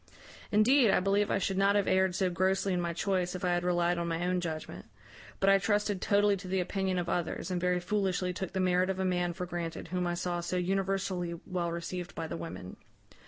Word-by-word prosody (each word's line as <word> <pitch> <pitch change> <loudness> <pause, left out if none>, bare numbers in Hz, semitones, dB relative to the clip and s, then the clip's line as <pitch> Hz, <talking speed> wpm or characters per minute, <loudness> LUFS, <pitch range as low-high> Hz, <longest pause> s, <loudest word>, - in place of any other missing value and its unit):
Indeed, 230 +3 +5
I - - +4
believe 200 +2 +1
I - - +2
should 195 0 -1
not 200 +1 +4
have 205 -1 +2
erred 190 -1 +2
so 190 - +1
grossly 190 +2 +1
in 180 - 0
my 170 0 -1
choice 180 +1 -1
if 185 - -3
I - - +2
had 175 0 0
relied 175 0 +1
on 170 - -2
my 165 +1 -1
own 180 0 0
judgment; 160 -2 -6 0.5
but 195 - +1
I 195 0 +6
trusted 205 -1 0
totally 205 0 +3
to 185 0 -9
the 190 +1 0
opinion 190 0 -1
of 175 -1 -1
others, 175 +1 -2
and 180 -1 -1
very 180 0 +2
foolishly 185 -1 -1
took 190 0 -5
the 190 - -1
merit 185 0 +2
of 190 - -1
a 190 - -1
man 180 -1 0
for 180 +1 -4
granted 170 -2 -5
whom 180 0 -1
I 175 - -1
saw 175 0 -2
so 175 +1 -2
universally 190 -1 -1
well 175 -2 -2
received 175 +1 -5
by 165 - -3
the 160 - -5
women. 130 - -7
180 Hz, 230 wpm, -30 LUFS, 175-195 Hz, 0.5 s, I